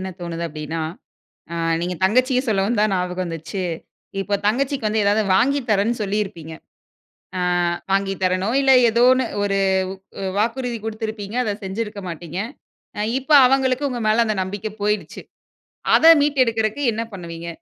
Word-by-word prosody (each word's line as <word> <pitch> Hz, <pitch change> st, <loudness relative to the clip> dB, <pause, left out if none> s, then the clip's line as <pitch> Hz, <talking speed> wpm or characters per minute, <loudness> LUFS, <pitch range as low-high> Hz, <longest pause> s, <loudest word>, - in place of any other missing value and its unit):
என்ன 190 Hz, 0 st, -4 dB
தோணுது 170 Hz, -1 st, -4 dB
அப்படின்னா, 155 Hz, +1 st, -5 dB, 0.7 s
அ -, -, -3 dB, 0.3 s
நீங்கத் 180 Hz, +1 st, -4 dB
தங்கச்சிய 255 Hz, +4 st, +2 dB
சொல்ல 205 Hz, -4 st, +2 dB
வந்தா 215 Hz, -2 st, +1 dB
ஞாபகம் 180 Hz, 0 st, -2 dB
வந்துச்சு. 165 Hz, +3 st, -5 dB, 0.6 s
இப்ப 200 Hz, +1 st, -1 dB
தங்கச்சிக்கு 260 Hz, +1 st, 0 dB
வந்து 215 Hz, 0 st, +1 dB
ஏதாது 205 Hz, +2 st, +3 dB
வாங்கி 275 Hz, +7 st, +3 dB
தரன்னு 210 Hz, +4 st, +2 dB
சொல்லி 205 Hz, +1 st, -1 dB
இருப்பீங்க. 165 Hz, -4 st, -9 dB, 0.9 s
அ -, -, -1 dB, 0.5 s
வாங்கி 195 Hz, 0 st, +1 dB
தரேனோ 185 Hz, +3 st, +1 dB
இல்ல. 270 Hz, -1 st, +4 dB, 0.2 s
ஏதோ 235 Hz, +2 st, +2 dB
ஒண்ணு 260 Hz, 0 st, 0 dB, 0.2 s
ஒரு 200 Hz, -1 st, 0 dB, 0.6 s
வ் 190 Hz, -1 st, -2 dB
வாக்குறுதி 235 Hz, +2 st, -1 dB
குடுத்திருப்பீங்க. 220 Hz, -1 st, -5 dB
அத 210 Hz, -4 st, -1 dB
செஞ்சிருக்க 205 Hz, +1 st, -4 dB
மாட்டீங்க. 170 Hz, +1 st, -6 dB, 0.6 s
அ -, -, 0 dB, 0.2 s
இப்ப 270 Hz, +4 st, -8 dB, 0.2 s
அவங்களுக்கு 265 Hz, +1 st, +1 dB
உங்க 245 Hz, -2 st, -4 dB
மேல 220 Hz, +2 st, +4 dB
அந்த 215 Hz, -, 0 dB
நம்பிக்கை 205 Hz, +3 st, -5 dB
போயிடுச்சு. 205 Hz, -6 st, -2 dB, 0.8 s
அத 320 Hz, -, +4 dB, 0.2 s
மீட்டு 285 Hz, -2 st, +3 dB
எடுக்கறதுக்கு 225 Hz, +4 st, -1 dB
என்ன 225 Hz, -, -2 dB
பண்ணுவீங்க? 170 Hz, -2 st, -7 dB
210 Hz, 150 wpm, -21 LUFS, 185-235 Hz, 0.9 s, இல்ல